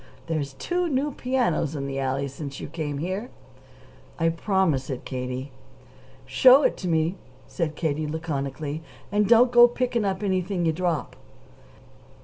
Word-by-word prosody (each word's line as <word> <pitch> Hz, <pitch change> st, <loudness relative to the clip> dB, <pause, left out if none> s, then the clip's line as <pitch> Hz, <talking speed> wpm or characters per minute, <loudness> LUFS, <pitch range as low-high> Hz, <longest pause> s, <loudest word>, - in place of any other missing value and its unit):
There's 150 Hz, -4 st, -2 dB
two 350 Hz, -, -1 dB
new 285 Hz, +1 st, 0 dB
pianos 245 Hz, -, 0 dB
in 140 Hz, -1 st, -3 dB
the 135 Hz, 0 st, -3 dB
alley 135 Hz, +1 st, -1 dB
since 140 Hz, 0 st, -7 dB
you -, -, -6 dB
came 150 Hz, -2 st, -4 dB
here." 190 Hz, -, -3 dB, 0.9 s
"I 165 Hz, -1 st, +2 dB
promise 165 Hz, -5 st, 0 dB
it, 130 Hz, -3 st, -5 dB
Katie." 130 Hz, +1 st, -4 dB, 0.7 s
"Show 265 Hz, +3 st, +6 dB
it -, -, +2 dB
to 185 Hz, -, -5 dB
me," 165 Hz, +2 st, +1 dB, 0.3 s
said 160 Hz, -3 st, -3 dB
Katie 155 Hz, -1 st, -1 dB
laconically. 150 Hz, -1 st, -4 dB, 0.3 s
"And 205 Hz, 0 st, +2 dB
don't 240 Hz, +1 st, +6 dB
go 240 Hz, 0 st, +8 dB
to 240 Hz, -, -11 dB
picking 245 Hz, -3 st, 0 dB
up 195 Hz, 0 st, -1 dB
anything 185 Hz, -2 st, 0 dB
you 160 Hz, -, +2 dB
drop!" 170 Hz, -2 st, -2 dB
165 Hz, 150 wpm, -25 LUFS, 145-205 Hz, 0.9 s, go